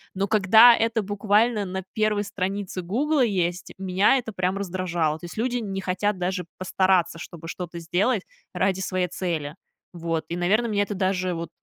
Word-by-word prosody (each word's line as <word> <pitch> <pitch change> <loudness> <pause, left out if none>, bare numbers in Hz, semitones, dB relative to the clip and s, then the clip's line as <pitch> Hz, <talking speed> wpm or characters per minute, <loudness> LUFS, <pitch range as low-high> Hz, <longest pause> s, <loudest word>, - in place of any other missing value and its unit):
Но 195 +1 0
когда 220 +4 +7
это 230 0 +1
буквально 210 +2 +2
на 190 0 -4
1 215 -1 +1
странице 195 -1 -3
"Гугла" 260 - +1
есть, 180 -5 -1
меня 190 +6 +3
это 230 -4 -5
прям 185 +1 -1
раздражало. 175 -5 -1
То - - -26
есть 175 - -10
люди 245 +2 0
не 195 -3 -4
хотят 190 +2 -1
даже 180 0 -2
постараться, 185 -2 +1
чтобы 165 0 -9
что-то 175 0 -6
сделать 185 +6 0 0.3
ради 190 +1 0
своей 185 -1 -1
цели. 160 -6 -3 0.4
Вот, 165 -2 -3
и, 170 - -3
наверно, 205 +7 +2
меня 205 -2 +1
это 205 - -4
даже 185 -1 0
вот, 165 0 -5
190 Hz, 170 wpm, -24 LUFS, 180-210 Hz, 0.4 s, когда